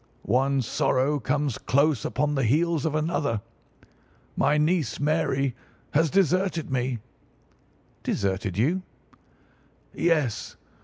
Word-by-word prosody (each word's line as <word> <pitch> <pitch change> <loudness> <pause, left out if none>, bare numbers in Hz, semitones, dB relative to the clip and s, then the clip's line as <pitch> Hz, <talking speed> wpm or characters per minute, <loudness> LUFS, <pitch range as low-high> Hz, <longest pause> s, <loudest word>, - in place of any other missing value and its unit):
One 135 +3 +2
sorrow 140 +3 +1
comes 140 0 -1
close 140 -2 +2
upon 150 0 0
the 135 - 0
heels 160 +5 +2
of 155 - -2
another. 155 -7 0 1.0
My 145 +2 +2
niece, 155 +1 +1
Mary, 145 -3 +1 0.4
has 160 +2 +3
deserted 185 -3 +1
me." 125 -1 0 1.0
"Deserted 95 -1 -1
you?" 160 - +2 1.1
"Yes. 155 -10 0
145 Hz, 100 wpm, -26 LUFS, 130-160 Hz, 1.1 s, has